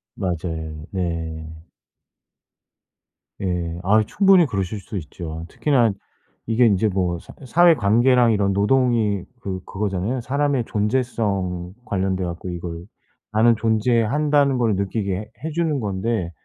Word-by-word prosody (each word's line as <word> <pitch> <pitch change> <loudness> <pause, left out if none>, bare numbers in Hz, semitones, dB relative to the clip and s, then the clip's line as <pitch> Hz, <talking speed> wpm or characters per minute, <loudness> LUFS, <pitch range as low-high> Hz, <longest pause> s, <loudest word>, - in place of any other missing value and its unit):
맞아요. 80 -3 -4
네. 80 -4 -3 1.9
예. 85 -2 -2
아 105 +3 +4
충분히 195 - +5
그러실 100 -3 -3
수 100 +2 -7
있죠. 80 0 -7
특히나 125 -7 +2 0.6
이게 115 +2 +3
인제 105 0 +3
뭐 90 -3 -1
사 - - -14
사회관계랑 125 - +4
이런 100 -1 +1
노동이 105 -2 +2 0.2
그 95 -2 -4
그거잖아요. 105 +5 -2
사람의 140 -1 0
존재성 100 -6 -1
관련돼 95 -1 -1
갖고 85 +1 -5
이걸 85 0 -6 0.5
'나는 115 +2 +4
존재한다.'는 125 +6 +2
걸 115 -4 +2
느끼게 100 0 -1
해 105 +3 -7
해주는 160 -2 -1
건데 100 -3 -2
105 Hz, 255 characters per minute, -22 LUFS, 90-120 Hz, 1.9 s, 충분히